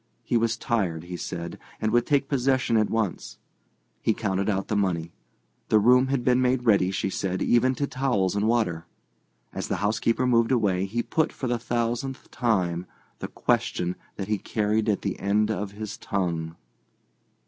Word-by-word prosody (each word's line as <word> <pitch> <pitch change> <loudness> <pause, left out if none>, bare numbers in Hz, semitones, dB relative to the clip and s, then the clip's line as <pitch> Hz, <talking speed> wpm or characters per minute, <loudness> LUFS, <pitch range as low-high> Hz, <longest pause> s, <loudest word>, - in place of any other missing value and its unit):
He 120 - -1
was 115 0 +2
tired, 95 -10 -1
he 90 +1 -7
said, 85 -1 -5 0.2
and 110 - 0
would 120 +1 +2
take 140 -2 +2
possession 130 -3 +1
at 110 -1 +3
once. 110 -5 -2 0.6
He 110 - +1
counted 100 -2 -1
out 95 -1 -1
the 105 - -1
money. 85 -5 0 0.6
The 110 - +5
room 125 +5 +5
had 135 -2 0
been 125 0 +4
made 125 0 +1
ready, 100 -5 +4
she 95 0 -2
said, 95 -1 -2
even 130 +2 +3
to 140 - -1
towels 125 -9 0
and 105 +1 +1
water. 105 -9 0 0.7
As - - -4
the - - -1
housekeeper 115 +4 +1
moved 115 -1 +3
away 100 -7 +2
he 120 +4 -2
put, 160 0 0
for - - -6
the 120 -1 0
thousandth 120 +3 -2
time, 90 -7 0 0.3
the - - -4
question 90 +1 0 0.2
that 95 - -5
he 105 -1 0
carried 110 +1 0
at 105 - 0
the 100 - -2
end 105 +2 +1
of 105 -2 -3
his 105 0 -6
tongue. 85 -4 -2
110 Hz, 175 wpm, -26 LUFS, 95-120 Hz, 0.7 s, The